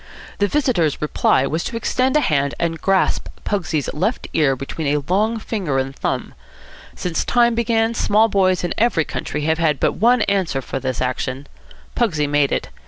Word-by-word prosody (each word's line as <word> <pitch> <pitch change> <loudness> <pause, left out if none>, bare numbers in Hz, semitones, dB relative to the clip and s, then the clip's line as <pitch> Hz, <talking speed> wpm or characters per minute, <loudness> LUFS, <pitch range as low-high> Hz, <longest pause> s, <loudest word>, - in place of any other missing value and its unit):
The 205 - +3
visitor's 205 - +1
reply 150 -3 +2
was 160 +4 -2
to 230 - -3
extend 255 +4 +1
a - - +3
hand 140 - 0
and 165 -1 -2
grasp 195 -1 +1 0.2
Pugsy's 165 -8 -1
left 215 +11 -1
ear 140 -4 +3
between 135 +4 -5
a 145 0 +1
long 215 +5 +1
finger 195 -10 -2
and 135 +1 -2
thumb. - - -3 0.6
Since 175 -3 -2
time 240 -1 +3
began, 230 0 +1
small 220 -1 +3
boys 185 -3 +2
in 175 - -1
every 220 -9 +2
country 150 - -4
have 160 +2 0
had 155 -5 +1
but - - +2
one 235 +2 +3
answer 190 -8 0
for 135 - -4
this 130 -2 -3
action. 130 +2 -2 0.5
Pugsy 165 -11 +1
made 145 -1 +2
it. - - -2
170 Hz, 175 wpm, -20 LUFS, 145-225 Hz, 0.6 s, The